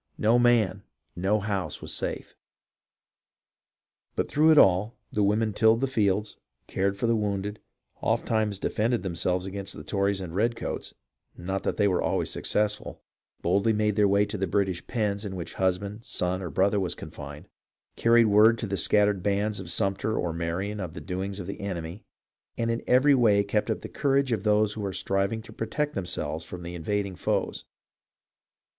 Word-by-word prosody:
No 115 Hz, +3 st, +4 dB
man, 120 Hz, -5 st, +3 dB, 0.3 s
no 95 Hz, +4 st, +1 dB
house, 100 Hz, -2 st, -2 dB
was -, -, -5 dB
safe. -, -, -4 dB, 1.8 s
But -, -, 0 dB
through 155 Hz, +2 st, +3 dB
it 155 Hz, -, +6 dB
all, 95 Hz, +2 st, +4 dB
the 105 Hz, -, 0 dB
women 105 Hz, +2 st, +2 dB
tilled 110 Hz, +2 st, +4 dB
the 135 Hz, -, +1 dB
fields, 105 Hz, -4 st, 0 dB, 0.3 s
cared 100 Hz, +1 st, -1 dB
for 120 Hz, -, -1 dB
the 115 Hz, 0 st, +3 dB
wounded, 105 Hz, -1 st, -2 dB, 0.4 s
ofttimes 110 Hz, -3 st, 0 dB
defended 115 Hz, +4 st, 0 dB
them 95 Hz, -3 st, -3 dB
selves 90 Hz, +2 st, 0 dB
against 95 Hz, 0 st, -5 dB
the -, -, -8 dB
Tories 100 Hz, 0 st, 0 dB
and 90 Hz, -3 st, -6 dB
redcoats 115 Hz, +5 st, -2 dB, 0.4 s
(not 95 Hz, +2 st, -3 dB
that -, -, -2 dB
they 105 Hz, -, +3 dB
were 90 Hz, -2 st, +1 dB
always -, -, -1 dB
successful), 105 Hz, 0 st, -2 dB, 0.4 s
boldly 100 Hz, +6 st, +2 dB
made 105 Hz, -1 st, +1 dB
their 105 Hz, 0 st, +4 dB
way 100 Hz, +1 st, +3 dB
to 105 Hz, -1 st, -5 dB
the 95 Hz, -, 0 dB
British 95 Hz, -1 st, -1 dB
pens 105 Hz, -3 st, -1 dB
in 100 Hz, -3 st, -5 dB
which 85 Hz, -2 st, -6 dB
husband, 100 Hz, +4 st, -1 dB
son, 90 Hz, -2 st, -2 dB
or 90 Hz, -, -4 dB
brother 100 Hz, +7 st, +2 dB
was 90 Hz, -4 st, -1 dB
confined; 75 Hz, 0 st, -9 dB, 0.5 s
carried 115 Hz, 0 st, +5 dB
word 110 Hz, +2 st, +6 dB
to 115 Hz, -, -3 dB
the 100 Hz, -1 st, -2 dB
scattered 100 Hz, +1 st, +3 dB
bands 100 Hz, +2 st, 0 dB
of 90 Hz, -3 st, -7 dB
Sumter 100 Hz, +4 st, 0 dB
or 85 Hz, -2 st, -1 dB
Marion 90 Hz, +5 st, -3 dB
of 90 Hz, -4 st, -5 dB
the -, -, -5 dB
doings 95 Hz, +2 st, -4 dB
of 90 Hz, -, -5 dB
the -, -, -6 dB
enemy, 90 Hz, -1 st, -5 dB, 0.5 s
and 115 Hz, 0 st, 0 dB
in 115 Hz, -, -2 dB
every 135 Hz, +3 st, +5 dB
way 110 Hz, -6 st, +4 dB
kept 105 Hz, +2 st, -1 dB
up 110 Hz, -, -1 dB
the -, -, -6 dB
courage 140 Hz, -2 st, +1 dB
of 110 Hz, -5 st, 0 dB
those 105 Hz, 0 st, +2 dB
who 110 Hz, -, -6 dB
were 100 Hz, -2 st, -3 dB
striving 100 Hz, +4 st, -1 dB
to -, -, -13 dB
protect 150 Hz, +7 st, -2 dB
themselves 80 Hz, -, -3 dB
from 90 Hz, +2 st, -8 dB
the 85 Hz, +1 st, -6 dB
invading 100 Hz, +3 st, -2 dB
foes. -, -, -1 dB
100 Hz, 180 wpm, -27 LUFS, 95-110 Hz, 1.8 s, it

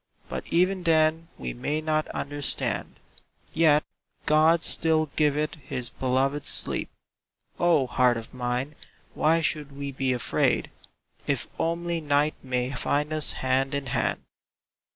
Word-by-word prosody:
But -, -, -5 dB
even 185 Hz, +2 st, +2 dB
then 160 Hz, -1 st, +2 dB
we 60 Hz, -1 st, -4 dB
may 145 Hz, -, -2 dB
not 155 Hz, 0 st, 0 dB
under 145 Hz, 0 st, -4 dB
stand; -, -, -1 dB, 0.6 s
Yet 155 Hz, -2 st, +4 dB, 0.4 s
God 160 Hz, +2 st, +4 dB
still 155 Hz, -2 st, +2 dB
giveth 150 Hz, 0 st, +1 dB
His 130 Hz, -5 st, -5 dB
beloved 135 Hz, +3 st, 0 dB
sleep -, -, 0 dB, 0.4 s
— -, -, -39 dB
Oh, 170 Hz, -6 st, +4 dB
Heart 125 Hz, -1 st, +3 dB
of 115 Hz, -, -8 dB
Mine, 125 Hz, +3 st, -2 dB, 0.4 s
why 165 Hz, +2 st, +3 dB
should 150 Hz, -2 st, -1 dB
we 140 Hz, 0 st, -5 dB
be 135 Hz, -1 st, -1 dB
afraid 125 Hz, -2 st, 0 dB, 0.6 s
If -, -, 0 dB
only 170 Hz, 0 st, -1 dB
night 145 Hz, 0 st, +2 dB
may 125 Hz, -1 st, -1 dB
find 150 Hz, +2 st, -1 dB
us 155 Hz, -1 st, +1 dB
hand 130 Hz, +2 st, 0 dB
in 140 Hz, -1 st, -2 dB
hand! 130 Hz, -, -1 dB
145 Hz, 135 wpm, -26 LUFS, 130-155 Hz, 0.6 s, Yet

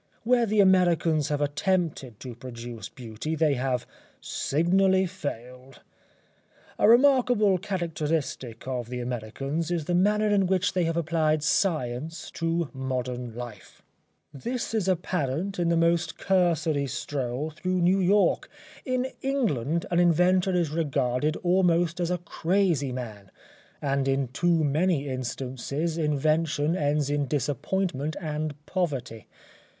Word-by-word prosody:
Where 240 Hz, 0 st, +3 dB
the 210 Hz, 0 st, +4 dB
Americans 175 Hz, -5 st, +3 dB
have 145 Hz, -1 st, -1 dB
attempted 145 Hz, -, -1 dB
to 125 Hz, -2 st, -6 dB
produce 120 Hz, -1 st, -8 dB
beauty 120 Hz, +5 st, -5 dB
they 155 Hz, -2 st, +2 dB
have 130 Hz, -1 st, -1 dB, 0.3 s
signally 190 Hz, +5 st, +2 dB
failed. 125 Hz, -5 st, -7 dB, 1.0 s
A -, -, +5 dB
remarkable 240 Hz, -6 st, +5 dB
characteristic 160 Hz, -, -3 dB
of 125 Hz, -3 st, -3 dB
the 125 Hz, 0 st, -4 dB
Americans 125 Hz, +7 st, -3 dB
is 170 Hz, -4 st, -1 dB
the 175 Hz, -, -1 dB
manner 210 Hz, +4 st, +3 dB
in 200 Hz, -2 st, +3 dB
which 190 Hz, +2 st, +1 dB
they 180 Hz, -2 st, +1 dB
have 165 Hz, 0 st, -1 dB
applied 155 Hz, -2 st, +1 dB
science 155 Hz, -2 st, -1 dB
to 165 Hz, -2 st, -1 dB
modern 125 Hz, -3 st, -4 dB
life. 120 Hz, -5 st, -9 dB, 0.5 s
This 235 Hz, -, -4 dB
is 215 Hz, -4 st, 0 dB
apparent 180 Hz, 0 st, -1 dB
in 170 Hz, -1 st, +2 dB
the 170 Hz, -, +2 dB
most 170 Hz, +1 st, +1 dB
cursory 165 Hz, -6 st, +1 dB
stroll 135 Hz, +1 st, -3 dB
through 185 Hz, +3 st, -2 dB
New 185 Hz, +3 st, +4 dB
York. 190 Hz, 0 st, +2 dB, 0.3 s
In 255 Hz, -1 st, 0 dB, 0.2 s
England 170 Hz, -, 0 dB
an 175 Hz, -, +3 dB
inventor 180 Hz, +2 st, +3 dB
is 170 Hz, -4 st, +1 dB
regarded 145 Hz, -2 st, 0 dB
almost 175 Hz, -1 st, +2 dB
as 175 Hz, -1 st, 0 dB
a 180 Hz, -, 0 dB
crazy 170 Hz, -4 st, 0 dB
man, 110 Hz, -6 st, -7 dB, 0.5 s
and 140 Hz, -1 st, 0 dB
in 135 Hz, -2 st, +1 dB
too 165 Hz, +4 st, +1 dB
many 150 Hz, 0 st, +1 dB
instances 130 Hz, +4 st, -3 dB
invention 155 Hz, 0 st, +1 dB
ends 145 Hz, -3 st, 0 dB
in 145 Hz, -1 st, 0 dB
disappointment 145 Hz, +3 st, -1 dB
and 155 Hz, -3 st, -3 dB
poverty. 135 Hz, -, -3 dB
155 Hz, 125 wpm, -26 LUFS, 135-180 Hz, 1.0 s, A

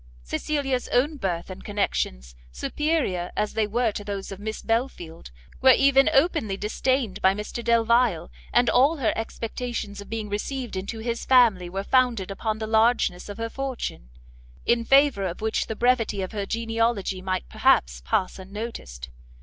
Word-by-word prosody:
Cecilia's 270 Hz, -, -2 dB
own 290 Hz, +5 st, +1 dB
birth 180 Hz, -6 st, -3 dB
and 185 Hz, -, -9 dB
connections, 60 Hz, -, -2 dB, 0.2 s
superior 190 Hz, -, -1 dB
as 210 Hz, -, 0 dB
they 220 Hz, -1 st, +1 dB
were 230 Hz, +1 st, +1 dB
to 205 Hz, -, -6 dB
those 200 Hz, -1 st, -5 dB
of 195 Hz, -, -7 dB
Miss 220 Hz, +1 st, -5 dB
Belfield, 225 Hz, -, -3 dB, 0.3 s
were 260 Hz, -1 st, +7 dB
even 275 Hz, 0 st, +5 dB
openly 270 Hz, -, +2 dB
disdained 220 Hz, 0 st, -1 dB
by 190 Hz, +1 st, +4 dB
Mr 210 Hz, +3 st, -5 dB
Delvile, 230 Hz, -6 st, +2 dB, 0.2 s
and 245 Hz, 0 st, +3 dB
all 275 Hz, +8 st, +4 dB
her 250 Hz, -6 st, +1 dB
expectations 225 Hz, -2 st, -4 dB
of 200 Hz, -, -12 dB
being 220 Hz, -2 st, -3 dB
received 235 Hz, +3 st, -4 dB
into 195 Hz, +4 st, -4 dB
his 235 Hz, 0 st, -3 dB
family 225 Hz, -9 st, +4 dB
were 195 Hz, +2 st, -3 dB
founded 235 Hz, -6 st, +2 dB
upon 215 Hz, +2 st, -2 dB
the 220 Hz, -, -4 dB
largeness 220 Hz, -4 st, +2 dB
of 205 Hz, -, -7 dB
her 230 Hz, 0 st, -2 dB
fortune, 255 Hz, -, -5 dB, 0.6 s
in 235 Hz, 0 st, +2 dB
favour 270 Hz, -8 st, +4 dB
of 175 Hz, -, -6 dB
which 220 Hz, 0 st, -1 dB
the 220 Hz, -, -4 dB
brevity 235 Hz, -4 st, +1 dB
of 185 Hz, -, -5 dB
her 205 Hz, -3 st, -4 dB
genealogy 225 Hz, -4 st, -1 dB
might 185 Hz, -1 st, -2 dB
perhaps -, -, +2 dB
pass 185 Hz, -, -1 dB
unnoticed. 190 Hz, -, -7 dB
220 Hz, 160 wpm, -25 LUFS, 195-245 Hz, 0.6 s, were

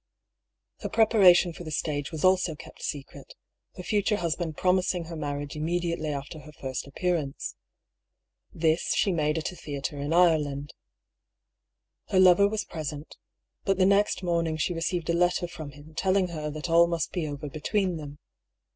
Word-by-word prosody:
Her -, -, -4 dB
prepara 215 Hz, -5 st, +6 dB
tion 175 Hz, -1 st, +1 dB
for 175 Hz, -, -9 dB
the 160 Hz, -, -6 dB
stage 150 Hz, -1 st, -2 dB
was 160 Hz, -2 st, -5 dB
also 185 Hz, -3 st, +3 dB
kept -, -, -13 dB
secret, 140 Hz, -3 st, -7 dB, 0.4 s
her 180 Hz, -, -7 dB
future 210 Hz, +2 st, +1 dB
hus 170 Hz, -5 st, -1 dB
band 165 Hz, -4 st, -4 dB
promising 180 Hz, -1 st, +1 dB
her 165 Hz, +1 st, -7 dB
marriage 145 Hz, -1 st, -4 dB
immediately 170 Hz, 0 st, -1 dB
after 145 Hz, +2 st, -5 dB
her 155 Hz, 0 st, -12 dB
first 130 Hz, -3 st, -5 dB
appearance. 150 Hz, -1 st, -2 dB, 1.0 s
This 160 Hz, 0 st, +1 dB
she 200 Hz, -, +2 dB
made 150 Hz, -2 st, +1 dB
at 160 Hz, -, -2 dB
a -, -, -11 dB
theatre 145 Hz, -1 st, -5 dB
in 145 Hz, +2 st, -3 dB
Ireland. 150 Hz, -5 st, +2 dB, 1.3 s
Her 185 Hz, -, +2 dB
lover 185 Hz, +2 st, +7 dB
was 215 Hz, +1 st, -2 dB
present 150 Hz, -1 st, -6 dB, 0.3 s
— -, -, -56 dB
but 195 Hz, -1 st, +1 dB
the 185 Hz, -, +4 dB
next 200 Hz, 0 st, +3 dB
morning 170 Hz, -2 st, 0 dB
she 165 Hz, +3 st, 0 dB
re 165 Hz, -, -4 dB
ceived 170 Hz, -1 st, -1 dB
a -, -, 0 dB
letter 175 Hz, +1 st, +2 dB
from 160 Hz, -4 st, -8 dB
him 150 Hz, +3 st, -14 dB
telling 185 Hz, +2 st, +1 dB
her 155 Hz, -3 st, -4 dB
that 150 Hz, +2 st, -5 dB
all 170 Hz, 0 st, +5 dB
must 170 Hz, -1 st, -2 dB
be 170 Hz, -4 st, -2 dB
over 145 Hz, 0 st, -5 dB
between 180 Hz, +5 st, -1 dB
them. 145 Hz, -1 st, -8 dB
165 Hz, 175 wpm, -27 LUFS, 150-180 Hz, 1.3 s, lover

